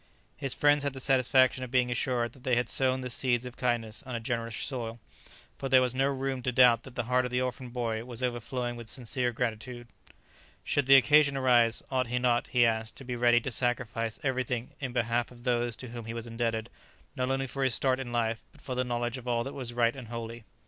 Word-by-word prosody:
His 135 Hz, -3 st, -2 dB
friends 145 Hz, 0 st, +4 dB
had 140 Hz, -1 st, -1 dB
the 135 Hz, -, -7 dB
satisfaction 130 Hz, 0 st, +3 dB
of 130 Hz, -, -6 dB
being 125 Hz, -1 st, +2 dB
assured 120 Hz, -1 st, -1 dB
that 130 Hz, -, -17 dB
they 130 Hz, -3 st, +2 dB
had 120 Hz, -1 st, +1 dB
sown 130 Hz, -1 st, +2 dB
the 125 Hz, -, -4 dB
seeds 120 Hz, -1 st, +1 dB
of 125 Hz, -, -8 dB
kindness 120 Hz, -2 st, -1 dB
on 130 Hz, -4 st, -6 dB
a -, -, -2 dB
generous 115 Hz, 0 st, -3 dB
soil, 115 Hz, -2 st, -4 dB, 0.6 s
for 135 Hz, -, -3 dB
there 130 Hz, 0 st, +7 dB
was 125 Hz, -1 st, 0 dB
no 135 Hz, +1 st, +2 dB
room 135 Hz, -1 st, -2 dB
to 125 Hz, -, -1 dB
doubt 120 Hz, -2 st, +6 dB
that 130 Hz, 0 st, -13 dB
the 120 Hz, -, -1 dB
heart 125 Hz, +2 st, +2 dB
of 125 Hz, -, -2 dB
the 125 Hz, 0 st, 0 dB
orphan 130 Hz, 0 st, -3 dB
boy 115 Hz, -2 st, -2 dB
was 120 Hz, 0 st, -7 dB
overflowing 120 Hz, 0 st, -2 dB
with 120 Hz, -2 st, -8 dB
sincere 125 Hz, 0 st, -1 dB
gratitude. 120 Hz, +1 st, -4 dB, 0.8 s
Should 145 Hz, -2 st, 0 dB
the 135 Hz, -, +9 dB
occasion 140 Hz, +1 st, +5 dB
arise, 120 Hz, -3 st, +3 dB
ought 130 Hz, -2 st, +1 dB
he 125 Hz, +1 st, -1 dB
not, 125 Hz, -1 st, +1 dB
he 120 Hz, -1 st, +4 dB
asked, 110 Hz, -1 st, -1 dB
to -, -, -10 dB
be 125 Hz, -1 st, -4 dB
ready 120 Hz, 0 st, +4 dB
to 135 Hz, -, -4 dB
sacrifice 115 Hz, -2 st, -1 dB
everything 130 Hz, -3 st, -1 dB
in 130 Hz, -3 st, -3 dB
behalf 120 Hz, 0 st, 0 dB
of 120 Hz, -1 st, -15 dB
those 120 Hz, -2 st, 0 dB
to 130 Hz, -, -8 dB
whom 120 Hz, -1 st, -7 dB
he 115 Hz, +1 st, -5 dB
was 115 Hz, 0 st, -5 dB
indebted 115 Hz, 0 st, -2 dB, 0.4 s
not 130 Hz, 0 st, -1 dB
only 135 Hz, 0 st, 0 dB
for 135 Hz, +1 st, -3 dB
his 130 Hz, -3 st, +4 dB
start 130 Hz, -1 st, +2 dB
in 125 Hz, -2 st, -5 dB
life, 115 Hz, -1 st, 0 dB
but -, -, -21 dB
for 130 Hz, -, -5 dB
the 125 Hz, 0 st, 0 dB
knowledge 120 Hz, 0 st, -2 dB
of 125 Hz, -, -12 dB
all 120 Hz, -1 st, +1 dB
that 135 Hz, -, -6 dB
was 125 Hz, -3 st, -5 dB
right 120 Hz, 0 st, +2 dB
and 130 Hz, -4 st, -9 dB
holy? 115 Hz, 0 st, -7 dB
125 Hz, 235 wpm, -29 LUFS, 120-130 Hz, 0.8 s, the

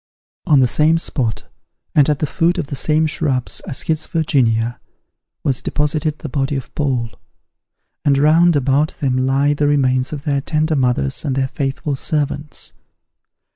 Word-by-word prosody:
On 145 Hz, -4 st, +5 dB
the 125 Hz, -, +4 dB
same 155 Hz, +6 st, +3 dB
spot, 130 Hz, -8 st, -2 dB, 0.5 s
and 145 Hz, -1 st, +4 dB
at 150 Hz, -, +2 dB
the 150 Hz, -, -1 dB
foot 170 Hz, +5 st, +1 dB
of 175 Hz, -, -1 dB
the -, -, -1 dB
same 155 Hz, +4 st, +1 dB
shrubs 150 Hz, -5 st, -1 dB
as 130 Hz, -, -5 dB
his 160 Hz, -1 st, -1 dB
Virginia, 120 Hz, -8 st, +1 dB, 0.6 s
was 130 Hz, -3 st, 0 dB
deposited 150 Hz, +1 st, -1 dB
the -, -, -7 dB
body 140 Hz, +1 st, -1 dB
of 135 Hz, -, -6 dB
Paul; 130 Hz, -6 st, -1 dB, 0.9 s
and 140 Hz, -2 st, +3 dB
round 160 Hz, +4 st, +4 dB
about 140 Hz, +2 st, +1 dB
them 130 Hz, -3 st, 0 dB
lie 135 Hz, +3 st, +2 dB
the 145 Hz, 0 st, 0 dB
remains 130 Hz, -3 st, +1 dB
of 145 Hz, -2 st, -6 dB
their 140 Hz, -3 st, 0 dB
tender 155 Hz, +2 st, 0 dB
mothers 125 Hz, -, 0 dB
and 140 Hz, -4 st, -1 dB
their 135 Hz, -1 st, 0 dB
faithful 140 Hz, +1 st, -2 dB
servants. 150 Hz, +1 st, -3 dB
145 Hz, 160 wpm, -18 LUFS, 130-155 Hz, 0.9 s, On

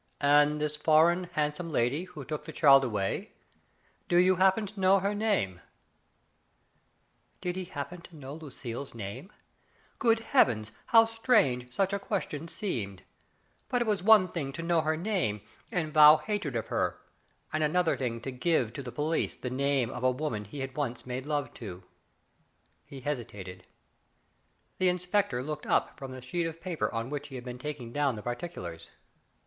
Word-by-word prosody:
"And 145 Hz, +1 st, +4 dB
this 150 Hz, 0 st, -1 dB
foreign, 160 Hz, +4 st, +4 dB
handsome 150 Hz, +3 st, -1 dB
lady 145 Hz, +4 st, 0 dB
who 155 Hz, -7 st, -10 dB
took 150 Hz, +1 st, -5 dB
the -, -, -6 dB
child 135 Hz, -3 st, +6 dB
away, 105 Hz, -6 st, -2 dB, 0.8 s
do 175 Hz, -, +4 dB
you 180 Hz, +1 st, +5 dB
happen 190 Hz, +4 st, +4 dB
to 200 Hz, +1 st, -10 dB
know 190 Hz, +1 st, +5 dB
her 200 Hz, +2 st, 0 dB
name? 200 Hz, -, 0 dB, 0.9 s
" -, -, -42 dB
Did 180 Hz, 0 st, -2 dB
he 185 Hz, -1 st, -4 dB
happen 165 Hz, +2 st, -6 dB
to 170 Hz, -, -14 dB
know 140 Hz, -2 st, -8 dB
Lucille's 135 Hz, -5 st, -7 dB
name! 105 Hz, -, -7 dB, 0.7 s
Good 225 Hz, -1 st, +3 dB
Heavens, 120 Hz, -, +2 dB, 0.2 s
how 225 Hz, -1 st, +7 dB
strange 215 Hz, -, +2 dB
such 195 Hz, +8 st, 0 dB
a 200 Hz, -, 0 dB
question 175 Hz, -6 st, -3 dB
seemed! 105 Hz, -, -4 dB, 0.7 s
But 245 Hz, -1 st, +2 dB
it -, -, -8 dB
was 205 Hz, -4 st, +1 dB
one 205 Hz, -1 st, +7 dB
thing 145 Hz, -7 st, -4 dB
to 165 Hz, -, -5 dB
know 170 Hz, -1 st, +2 dB
her 155 Hz, 0 st, 0 dB
name, 160 Hz, -, -1 dB, 0.3 s
and 160 Hz, -4 st, -2 dB
vow 150 Hz, 0 st, +9 dB
hatred 200 Hz, -, -3 dB
of 115 Hz, -, -3 dB
her, -, -, -1 dB, 0.5 s
and 155 Hz, 0 st, +1 dB
another 165 Hz, +2 st, +2 dB
thing 115 Hz, -3 st, -3 dB
to 135 Hz, -, -4 dB
give 125 Hz, -3 st, +1 dB
to 140 Hz, -, -5 dB
the 125 Hz, -2 st, -7 dB
police 155 Hz, +4 st, -1 dB
the 125 Hz, -, -5 dB
name 135 Hz, -2 st, +1 dB
of -, -, -6 dB
a 130 Hz, -, +5 dB
woman 125 Hz, -6 st, -3 dB
he 135 Hz, +6 st, -5 dB
once 135 Hz, -3 st, -4 dB
made 130 Hz, +2 st, -5 dB
love 145 Hz, -2 st, -1 dB
to. 95 Hz, -5 st, -8 dB, 1.0 s
He 135 Hz, -2 st, -10 dB
hesitated. 100 Hz, -10 st, -5 dB, 1.1 s
The 185 Hz, -1 st, +4 dB
inspector 180 Hz, -7 st, 0 dB
looked 150 Hz, +2 st, -5 dB
up -, -, +1 dB
from 135 Hz, -2 st, -7 dB
the 130 Hz, -1 st, -9 dB
sheet 170 Hz, +7 st, -2 dB
of 165 Hz, 0 st, -7 dB
paper 175 Hz, -2 st, -2 dB
on 115 Hz, +3 st, -3 dB
which 145 Hz, 0 st, -4 dB
he 135 Hz, -, -10 dB
had 125 Hz, -, -6 dB
been 125 Hz, 0 st, -6 dB
taking 135 Hz, -4 st, -6 dB
down 145 Hz, -4 st, +1 dB
the 105 Hz, -, -8 dB
particulars. 120 Hz, -, -6 dB
150 Hz, 175 wpm, -29 LUFS, 125-180 Hz, 1.1 s, vow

